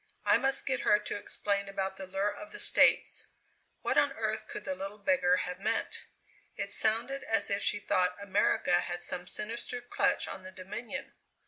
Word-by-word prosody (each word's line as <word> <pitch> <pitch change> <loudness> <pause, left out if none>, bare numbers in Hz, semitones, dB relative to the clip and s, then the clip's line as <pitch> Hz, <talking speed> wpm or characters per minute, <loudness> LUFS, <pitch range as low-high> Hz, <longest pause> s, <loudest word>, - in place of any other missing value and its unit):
I - - +5
must 270 +2 +1
get 260 -2 +1
her 210 -6 +4
to 210 - -5
explain 200 -1 -2
about 195 -1 -2
the 190 - -7
lure 195 +2 -1
of 315 - -10
the 420 - -8
States. - - +4 0.6
What - - +3
on - - +2
earth - - -2
could 420 0 -7
the 280 - -2
little 195 -5 -6
beggar 205 -7 +3
have 180 +1 -5
meant? 220 +3 -1 0.5
It - - -2
sounded 235 +5 +2
as 225 -2 +2
if 200 - +1
she - - +1
thought 180 -2 +1
America 200 -3 +2
had 175 0 -4
some 180 +1 -2
sinister 230 +5 -4
clutch 245 0 0
on 190 - -6
the 185 - -9
Dominion. 190 +5 -5
205 Hz, 185 wpm, -31 LUFS, 190-240 Hz, 0.6 s, I